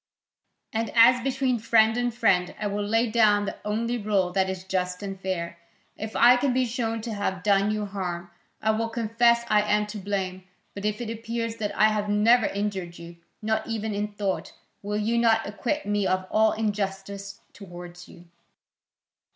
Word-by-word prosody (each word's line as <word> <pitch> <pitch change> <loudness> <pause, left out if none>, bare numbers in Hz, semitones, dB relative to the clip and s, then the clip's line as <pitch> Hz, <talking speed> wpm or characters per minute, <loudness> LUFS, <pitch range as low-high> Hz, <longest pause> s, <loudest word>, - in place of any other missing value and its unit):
And 225 0 -1
as 240 +2 +7
between 260 -1 0
friend 225 0 +4
and 245 0 0
friend, 195 -7 +1
I 215 - -3
will 205 0 -1
lay 225 +3 +1
down 210 -3 +4
the - - -5
only 230 +3 -1
rule 200 -4 +1
that 190 0 +1
is 190 -1 -5
just 180 0 -2
and 195 -1 -6
fair: 170 -3 -3 0.4
if 220 +1 -7
I 245 +1 +7
can 255 0 +1
be 255 0 +2
shown 230 -2 -2
to 225 0 -5
have 190 -3 -3
done 200 0 +3
you 215 -1 -1
harm, 180 -3 -5 0.3
I 220 - +3
will 225 +1 -1
confess 235 +1 +2
I 210 - +4
am 210 0 +1
to 210 0 -7
blame, 190 -2 -3 0.3
but 200 +1 -6
if 210 +2 -1
it 230 -2 -4
appears 230 0 -4
that 210 -2 -3
I 215 - +6
have 210 -1 -1
never 220 +3 +4
injured 195 -4 -3
you, 170 0 -11 0.3
not 220 0 -1
even 220 -1 -3
in 205 +1 -1
thought, 200 -2 -3 0.3
will 210 +1 -3
you 225 +3 +1
not 225 -1 +3
acquit 245 +8 -3
me 205 -1 0
of 185 0 0
all 220 0 +4
injustice 200 -2 -3
towards 175 -2 -11
you?" 175 0 -15
210 Hz, 185 wpm, -26 LUFS, 195-230 Hz, 0.4 s, as